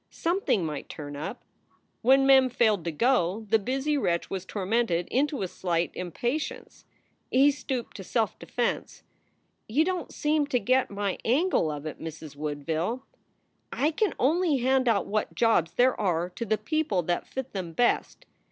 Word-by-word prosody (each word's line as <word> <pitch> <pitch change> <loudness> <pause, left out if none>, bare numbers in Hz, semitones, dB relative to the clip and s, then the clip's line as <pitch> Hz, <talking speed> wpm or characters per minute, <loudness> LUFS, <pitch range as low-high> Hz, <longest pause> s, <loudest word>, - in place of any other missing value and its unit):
Something 335 - 0
might 150 -2 -5
turn 145 -1 -7
up. 190 - -6 0.6
When 270 +3 +5
Mem 265 -1 +6
failed 220 -7 +2
to 170 - -1
go, 220 - +1
the 225 - +5
busy 270 +6 0
wretch 170 -8 -1
was 190 -1 -3
tormented 200 -3 0
into 280 -2 +1
a - - -1
slight 170 -1 -1
impatience. 240 - -4 0.4
He 275 +3 +5
stooped 265 -5 -5
to 195 - -7
self 220 +2 -1
defense. 240 -1 -3 0.7
"You 290 +9 +3
don 365 -2 -2
t - - -15
seem 300 -1 +1
to 255 -4 +1
get 255 +5 +2
my 200 -1 -2
angle 275 - +2
of 150 0 -5
it, 155 - -6
Mrs. 155 -2 -8
Woodville. 160 - -3 0.7
I 300 +3 +1
can 410 +6 0
only 315 +2 +2
hand 260 +1 +2
out 220 -4 +3
what 215 +1 -2
jobs 225 -8 +2
there 255 +1 +4
are 175 -2 0
to 235 - -5
the 215 +1 +2
people 310 - 0
that 175 +2 -1
fit 265 -1 -6
them 185 -4 -4
best. 240 +9 0
230 Hz, 165 wpm, -27 LUFS, 175-270 Hz, 0.7 s, Mem